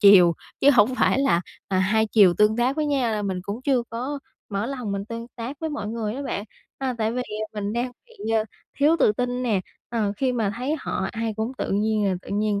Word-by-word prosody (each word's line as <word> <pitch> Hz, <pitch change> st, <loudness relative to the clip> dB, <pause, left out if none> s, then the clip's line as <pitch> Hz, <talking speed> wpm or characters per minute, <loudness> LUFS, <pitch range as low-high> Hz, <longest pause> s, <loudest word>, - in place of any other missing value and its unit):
chiều 190 Hz, -5 st, +8 dB, 0.3 s
chứ 280 Hz, -, +7 dB
hổng 245 Hz, -1 st, +5 dB
phải 255 Hz, -, +3 dB
là, 270 Hz, -11 st, +3 dB, 0.3 s
à, 190 Hz, -, +1 dB
hai 215 Hz, +4 st, +3 dB
chiều 205 Hz, -5 st, +6 dB
tương 210 Hz, +2 st, +4 dB
tác 250 Hz, +4 st, +1 dB
với 305 Hz, -1 st, +1 dB
nhau, 265 Hz, -6 st, +1 dB
là 210 Hz, -1 st, -1 dB
mình 190 Hz, -2 st, -2 dB
cũng 205 Hz, +6 st, -5 dB
chưa 260 Hz, -3 st, +2 dB
có 255 Hz, +6 st, -3 dB, 0.3 s
mở 200 Hz, +1 st, -2 dB
lòng 250 Hz, -6 st, -3 dB
mình 200 Hz, 0 st, -2 dB
tương 230 Hz, +2 st, -6 dB
tác 250 Hz, +4 st, -5 dB
với 320 Hz, -1 st, -2 dB
mọi 290 Hz, -9 st, -4 dB
người 220 Hz, -1 st, -2 dB
đó 275 Hz, -, -4 dB
bạn. 205 Hz, -7 st, -3 dB, 0.3 s
À, 265 Hz, -2 st, -1 dB
tại 220 Hz, 0 st, +1 dB
vì, 250 Hz, +1 st, -1 dB
à, 215 Hz, -2 st, -4 dB
mình 205 Hz, -1 st, -2 dB
đang 240 Hz, +2 st, -1 dB, 0.2 s
bị, 465 Hz, -, -6 dB
ờ, 220 Hz, -1 st, +3 dB, 0.3 s
thiếu 300 Hz, +4 st, +5 dB
tự -, -, +5 dB
tin 250 Hz, +2 st, -1 dB
nè, 220 Hz, -6 st, +1 dB, 0.3 s
ờ, 220 Hz, -4 st, 0 dB
khi 260 Hz, +3 st, +1 dB
mà 220 Hz, -5 st, 0 dB
thấy 260 Hz, +5 st, -1 dB
họ 190 Hz, -, -2 dB
ai 225 Hz, -1 st, -2 dB
cũng 220 Hz, +3 st, -2 dB
tự -, -, -2 dB
nhiên 215 Hz, +1 st, +1 dB
là 190 Hz, -, +2 dB
tự -, -, -13 dB
nhiên 205 Hz, 0 st, +1 dB
225 Hz, 245 wpm, -24 LUFS, 205-255 Hz, 0.3 s, chiều